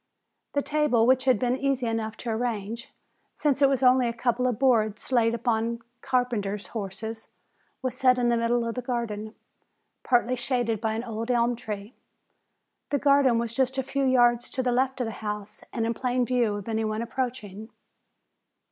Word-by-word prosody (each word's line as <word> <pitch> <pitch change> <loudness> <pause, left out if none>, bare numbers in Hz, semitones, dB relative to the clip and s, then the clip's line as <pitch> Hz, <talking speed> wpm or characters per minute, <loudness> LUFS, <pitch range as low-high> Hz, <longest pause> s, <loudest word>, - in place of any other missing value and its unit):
The 285 - +1
table, 295 -7 +2
which 260 +1 +3
had 255 -3 +4
been 250 +3 0
easy 275 -2 0
enough 225 -1 -2
to 235 - -4
arrange, 230 +1 -3 0.4
since 290 -2 0
it 275 - +6
was 270 -1 0
only 250 -1 +5
a 235 - -2
couple 240 +1 0
of 245 -4 -1
boards 220 -4 +1
laid 230 -2 +3
upon 230 0 -1 0.2
carpenter's 220 -6 -1
horses, 220 +1 -6 0.6
was 255 -1 -2
set 255 -1 +4
in 240 -1 +2
the 235 - +3
middle 230 0 +1
of 230 - -2
the 250 - -4
garden, 225 -3 -4 0.7
partly 245 0 +2
shaded 240 -3 -1
by 220 -1 0
an 225 - -3
old 230 0 -5
elm 240 0 +2
tree. 210 -1 -7 1.0
The 285 - +1
garden 280 -3 +4
was 230 -1 -2
just 265 +1 0
a 265 - +1
few 275 +1 -2
yards 240 -2 +3
to 260 - -2
the 250 - +1
left 260 +2 +1
of - - 0
the 225 - -3
house 210 -1 -5
and 230 - -1
in 230 - 0
plain 250 +1 0
view 240 -4 +1
of 205 0 -7
any 220 -1 -1
one 215 +1 -2
approaching. 235 -4 -4
240 Hz, 185 wpm, -26 LUFS, 225-255 Hz, 1.0 s, it